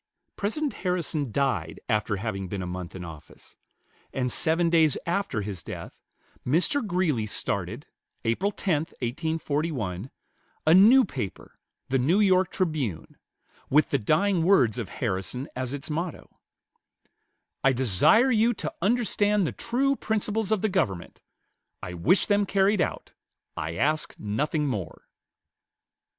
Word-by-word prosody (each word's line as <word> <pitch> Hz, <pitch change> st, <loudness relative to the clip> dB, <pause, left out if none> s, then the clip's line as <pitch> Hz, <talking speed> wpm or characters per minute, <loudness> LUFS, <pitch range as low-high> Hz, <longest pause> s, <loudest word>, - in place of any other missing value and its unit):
President 275 Hz, +9 st, -2 dB
Harrison 165 Hz, -, -1 dB
died 105 Hz, -, -1 dB
after 105 Hz, -2 st, 0 dB
having 95 Hz, -2 st, -4 dB
been 95 Hz, 0 st, -4 dB
a -, -, -4 dB
month 90 Hz, 0 st, -6 dB
in 90 Hz, -2 st, -6 dB
office; 80 Hz, -2 st, -12 dB, 0.6 s
and 125 Hz, -2 st, -1 dB
seven 165 Hz, +5 st, +2 dB
days 160 Hz, -3 st, +4 dB
after 170 Hz, -, -1 dB
his 100 Hz, -4 st, -5 dB
death, -, -, -8 dB, 0.5 s
Mr. 175 Hz, -, +1 dB
Greeley 175 Hz, -, 0 dB
started, 100 Hz, -, -2 dB, 0.4 s
April 150 Hz, -, +1 dB
10, 185 Hz, -5 st, 0 dB, 0.2 s
1841, 140 Hz, -, -2 dB, 0.6 s
a 160 Hz, -, +6 dB
new 225 Hz, +8 st, +7 dB
paper, 120 Hz, -, -7 dB, 0.3 s
the 135 Hz, 0 st, +2 dB
"New 160 Hz, +11 st, +3 dB
York 185 Hz, -3 st, +4 dB
Tribune," 150 Hz, -, -2 dB, 0.5 s
with 150 Hz, +3 st, +3 dB
the 140 Hz, -, +2 dB
dying 170 Hz, -, +2 dB
words 130 Hz, -, +3 dB
of 110 Hz, -, -4 dB
Harrison 120 Hz, +4 st, -3 dB
as 130 Hz, -1 st, -3 dB
its 145 Hz, +2 st, -4 dB
motto: 165 Hz, +1 st, -4 dB, 1.3 s
"I 135 Hz, -, +5 dB
desire 130 Hz, -, +4 dB
you 230 Hz, 0 st, +3 dB
to -, -, -5 dB
understand 210 Hz, -2 st, +2 dB
the -, -, -1 dB
true 270 Hz, +4 st, 0 dB
principles 220 Hz, -2 st, -1 dB
of 215 Hz, -2 st, +1 dB
the -, -, +4 dB
government. 100 Hz, -, -2 dB, 0.6 s
I 90 Hz, -, -5 dB
wish 130 Hz, -, +3 dB
them 205 Hz, -1 st, +2 dB
carried 195 Hz, 0 st, +2 dB
out. -, -, -3 dB, 0.4 s
I 80 Hz, +1 st, -4 dB
ask 150 Hz, -, 0 dB
nothing 150 Hz, +9 st, -1 dB
more." 105 Hz, -, -4 dB
150 Hz, 135 wpm, -26 LUFS, -, 1.3 s, new